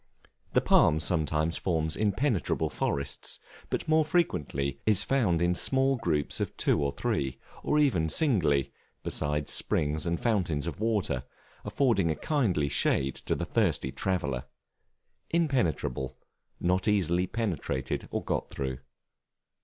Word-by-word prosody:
The - - +4
Palm 75 - +4
sometimes 80 0 0
forms 80 -3 0
impenetrable 105 - 0
forests; 70 0 -2 0.3
but - - -2
more 155 0 +4
frequently 75 - -1
is 105 -3 +6
found 100 -11 +1
in 90 0 +3
small 135 +8 +2
groups 80 - -1
of - - -3
two - - +2
or 70 - 0
three, 65 -1 -2 0.2
or 150 - +1
even 110 - +2
singly, 80 - +2 0.3
beside 75 -1 -2
springs 75 +3 0
and 85 0 0
fountains 90 -11 0
of 85 - -5
water, 100 - 0 0.4
affording 115 -11 +1
a 80 - 0
kindly 105 - 0
shade 70 -1 +1
to - - -2
the - - -3
thirsty 65 - +1
traveller. 75 -10 -2 0.8
Impenetrable, 120 - 0 0.4
not 90 +3 +1
easily 90 -3 +2
penetrated 85 - -3
or - - -3
got - - -2
through. 65 -2 -4
85 Hz, 130 wpm, -29 LUFS, 75-115 Hz, 0.8 s, is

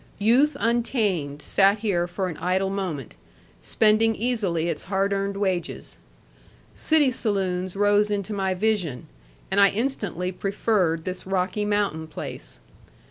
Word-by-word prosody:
Youth 245 +9 +3
untamed 205 - 0
sat 195 +1 +4
here 195 -5 0
for 185 +2 -3
an 170 - -5
idle 190 +2 0
moment, 180 - -4 0.5
spending 220 +1 +3
easily 205 -9 0
its 170 - -3
hard 195 0 +1
earned 195 0 -2
wages. 185 -4 -3 0.7
City 305 -4 +3
saloons 190 -6 -1
rose 205 +1 +3
into 205 0 -2
my 190 -2 -1
vision, 180 - -1 0.5
and 200 +1 +4
I 200 - +7
instantly 200 -6 -2
preferred 190 -4 0
this 185 0 -5
Rocky 195 +2 -1
Mountain 205 -6 -1
place. - - -8
195 Hz, 130 wpm, -24 LUFS, 180-210 Hz, 0.7 s, I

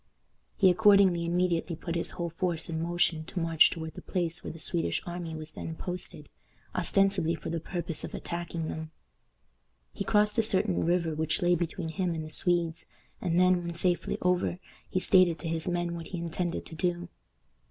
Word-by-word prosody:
He 190 -3 +6
accordingly 195 -4 +5
immediately 175 -1 0
put 170 +1 -5
his 170 - 0
whole 170 -1 -2
force 170 -1 -1
in 160 0 -2
motion 170 -1 +1
to 180 - -4
march 165 -2 +5
toward 160 -1 -5
the - - -9
place 175 -2 -2
where - - -5
the - - -10
Swedish 165 +1 0
army 175 -2 -5
was 155 0 -5
then 160 +1 -6
posted, 180 +2 -6 0.5
ostensibly 195 -4 +2
for 160 - -6
the 165 - -1
purpose 170 -1 -4
of - - -6
attacking 170 -1 -4
them. 160 0 -5 1.0
He - - -3
crossed 210 +1 +2
a - - +7
certain 200 -4 +2
river 170 -1 +1
which 155 +2 0
lay 175 0 +4
between 170 0 -2
him 175 0 -1
and 160 -1 -4
the 155 - -7
Swedes, 170 -1 +1 0.4
and 175 -1 +1
then, 180 -1 +4
when 170 0 -5
safely 175 0 0
over, 180 -1 +1 0.3
he 185 - 0
stated 185 -3 +5
to 165 - -5
his 165 +1 -1
men 175 -1 -1
what 170 -1 -6
he 185 - -5
intended 170 +1 -3
to - - -11
do. 175 +1 -1
170 Hz, 185 wpm, -29 LUFS, 165-180 Hz, 1.0 s, a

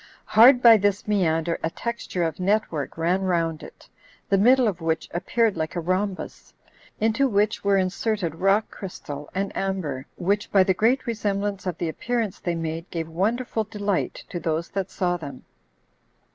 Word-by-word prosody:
Hard 245 +4 +6
by 230 -2 +9
this 205 0 0
meander 170 -5 +1
a 165 - +1
texture 235 -3 -4
of 160 -1 -2
net 205 +4 +1
work 150 -2 -4
ran 175 +4 +1
round 165 -4 0
it, - - -13 0.4
the 200 - +4
middle 250 +3 +5
of 180 -5 -2
which 160 0 -1
appeared 215 +5 +1
like 160 +2 -3
a - - -1
rhombus, 185 +3 -3 0.4
into 225 +5 +2
which 210 -2 +1
were 200 -1 +3
inserted 190 -1 -1
rock 195 +5 +1
crystal 150 -6 -8
and 195 +1 -2
amber, 170 -9 -3
which, 200 +3 -1
by 195 -2 +6
the 190 - +2
great 235 +8 +2
resemblance 205 -4 -2
of 180 - -2
the 170 - -2
appearance 225 +4 -2
they 175 -1 -2
made, 165 +1 -4
gave 165 -2 -4
wonderful 220 +7 -1
delight 205 -2 -2
to 175 - -4
those 165 +1 -2
that 195 -1 -3
saw 175 -2 -1
them. 140 -6 -9
190 Hz, 170 wpm, -24 LUFS, 165-210 Hz, 0.4 s, by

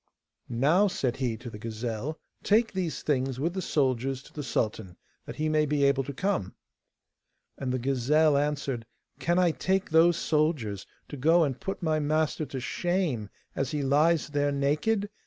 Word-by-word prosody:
'Now,' 150 - +3
said 130 -9 -1
he 125 -4 -1
to 120 +1 -9
the 105 - -9
gazelle, 115 +6 -4 0.2
'take 220 +2 +2
these 180 -4 -3
things 130 -3 0
with 165 +5 -1
the 190 - -3
soldiers 135 -4 0
to - - -17
the 150 - -5
sultan, 110 -8 -2 0.3
that - - -6
he 155 +1 -1
may 155 -1 +2
be 145 -1 +1
able 140 -1 +3
to 140 - -4
come.' 160 - -2 1.0
And 130 -2 -3
the 130 - 0
gazelle 140 +4 +2
answered: 140 -5 -1 0.3
'Can 175 +1 +1
I 180 -2 +4
take 190 +2 -1
those 165 +1 +5
soldiers 150 - 0 0.2
to 145 - -7
go 165 +6 +4
and 135 -4 -2
put 195 -1 -4
my 155 -2 +1
master 155 0 0
to 135 0 -5
shame 155 - -1 0.3
as 135 - -1
he 150 -2 -2
lies 150 +3 +3
there 145 -1 +1
naked? 150 +10 +1
145 Hz, 175 wpm, -28 LUFS, 130-160 Hz, 1.0 s, those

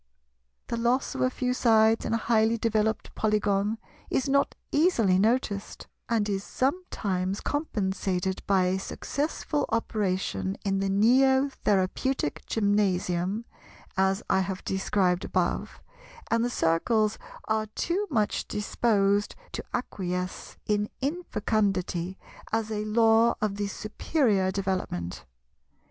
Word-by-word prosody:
The 235 - -3
loss 240 +3 +1
of - - -4
a 255 - +3
few 250 0 -1
sides 225 -2 +4
in - - -1
a - - +2
highly 225 0 +2
developed 220 -1 0
Polygon 210 0 +1 0.3
is 265 - 0
not 280 +1 +2 0.2
easily 235 - +3
noticed, 215 -2 0 0.2
and 225 -3 +1
is 195 -1 -1
sometimes 205 - -1
compensated 190 - -1
by 195 -2 +4
a 185 +1 +1
successful 290 +6 -2
operation 195 -3 -1
in 195 -1 +1
the 195 0 0
Neo 265 +7 +4
Therapeutic 205 - 0
Gymnasium, 200 -1 +1 0.5
as 190 +2 +1
I 190 - +3
have 190 0 -3
described 190 -2 +1
above; - - -2 0.5
and 230 0 +3
the 245 - +1
Circles 215 +4 +1 0.3
are 220 0 0
too 350 - -2
much 215 -7 0
disposed 205 -1 +1 0.2
to - - -5
acquiesce 180 -6 -4
in 210 0 0
infecundity 205 - -1 0.3
as 225 0 -1
a 210 0 -2
law 225 +1 +4
of 205 -2 -1
the 205 0 -1
superior 215 - 0
development. 185 - -3
210 Hz, 120 wpm, -27 LUFS, 190-230 Hz, 0.5 s, sides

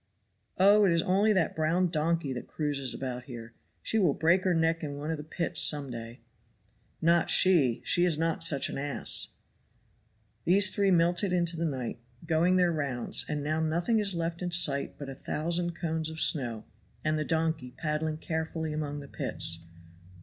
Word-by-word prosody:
"Oh, 205 +3 +6
it 195 - +4
is 165 -1 +2
only 200 +4 +2
that 185 -6 +1
brown 170 +3 +1
donkey 160 -3 -1
that 125 - -7
cruises 145 -4 -3
about 125 -2 -5
here. 120 -3 -10 0.3
She 220 - 0
will 175 -8 +2
break 175 +4 +2
her 185 - +3
neck 165 0 +1
in 145 -2 -5
one 150 +2 -4
of 160 - -2
the 150 - -7
pits 170 +1 0
some 145 -3 +2
day." 115 0 -8 0.8
"Not 170 +1 +3
she. 155 -11 +4
She 175 - +3
is 175 -4 +2
not 165 +1 0
such 145 -4 +3
an - - -5
ass." 140 -3 +1 1.2
These 190 +1 +4
three 200 -1 +2
melted 175 +2 +2
into 175 -1 +1
the 165 +1 -2
night, 130 -6 -4 0.3
going 165 +3 +2
their 180 -1 +3
rounds; 140 -6 -2
and 150 -1 -3
now 155 +2 -1
nothing 170 +8 0
is 200 -3 -1
left 170 +1 -3
in 180 - -2
sight 150 -5 +1
but 145 - -8
a 135 - -6
thousand 170 +5 -2
cones 160 -2 -3
of 160 0 -7
snow, 120 -9 0 0.4
and 155 0 +1
the - - 0
donkey 160 -5 -1
paddling 155 +2 -3
carefully 160 -1 -4
among 145 -1 -4
the 140 - -11
pits. 85 -9 +1
160 Hz, 180 wpm, -28 LUFS, 145-175 Hz, 1.2 s, Oh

